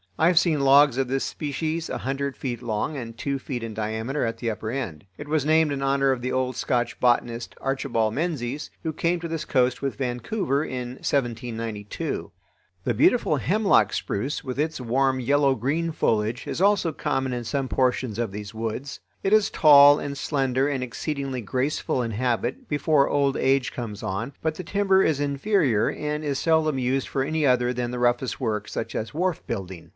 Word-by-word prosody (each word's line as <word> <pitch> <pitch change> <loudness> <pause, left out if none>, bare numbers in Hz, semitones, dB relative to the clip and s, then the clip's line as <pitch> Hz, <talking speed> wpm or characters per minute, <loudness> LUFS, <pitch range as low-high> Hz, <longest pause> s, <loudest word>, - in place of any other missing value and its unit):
I 160 - +4
have 175 -1 +3
seen 165 -4 +1
logs 140 -1 +5
of 135 - +1
this 135 +1 -1
species 155 +3 -3
a - - -3
hundred 140 +1 -3
feet 120 -3 -4
long 120 +5 -2
and 115 -4 -7
two 140 +2 -2
feet 125 -3 -5
in 115 -1 -5
diameter 110 +6 -2
at 115 -1 -2
the 115 -2 -2
upper 110 +1 -5
end. 110 - -4
It 145 - -8
was 150 -1 0
named 160 -1 +4
in 140 -1 -3
honor 135 0 +2
of 130 -2 -1
the 130 +1 -2
old 130 -1 -1
Scotch 120 -1 -1
botanist 120 -1 +1
Archibald 125 -5 0
Menzies, 145 -3 -2
who 160 -1 -2
came 170 +3 0
to 170 - -5
this 165 -1 -4
coast 125 -2 +1
with 135 -1 -2
Vancouver 135 - -1
in 125 -4 -4
1792. 115 -6 -3 0.5
The 120 - 0
beautiful 150 - +3
hemlock 185 - +3
spruce 130 +9 -2
with 130 0 -5
its 155 0 -1
warm 130 +2 +1
yellow 140 +2 +3
green 150 +8 -1
foliage 110 -5 0
is - - -3
also 195 -4 +3
common 135 -4 -1
in 120 -1 -3
some 135 +3 -2
portions 125 -3 0
of 115 -4 -1
these 105 +1 -7
woods. 115 +5 -4 0.2
It 195 - +2
is 215 -1 +5
tall 145 -1 +8
and 140 -1 -4
slender 135 -2 0
and 135 -3 -1
exceedingly 135 +2 -3
graceful 130 +3 -1
in 115 - -3
habit 120 +2 -1
before 145 -1 +2
old 140 -1 +1
age 135 -1 +2
comes 110 -4 -6
on, 110 +6 -3
but 160 0 +1
the 185 - -6
timber 195 -1 +2
is 150 -3 +1
inferior 140 - +1
and 150 0 -3
is 140 -2 -1
seldom 160 -3 +2
used 130 +1 0
for 135 - -1
any 155 +2 -1
other 125 -1 +3
than 120 0 -2
the 125 0 -4
roughest 120 +1 +1
work, 110 -5 -2
such - - -4
as 115 +5 -4
wharf 180 +1 0
building. 95 -6 -5
135 Hz, 190 wpm, -25 LUFS, 120-150 Hz, 0.5 s, tall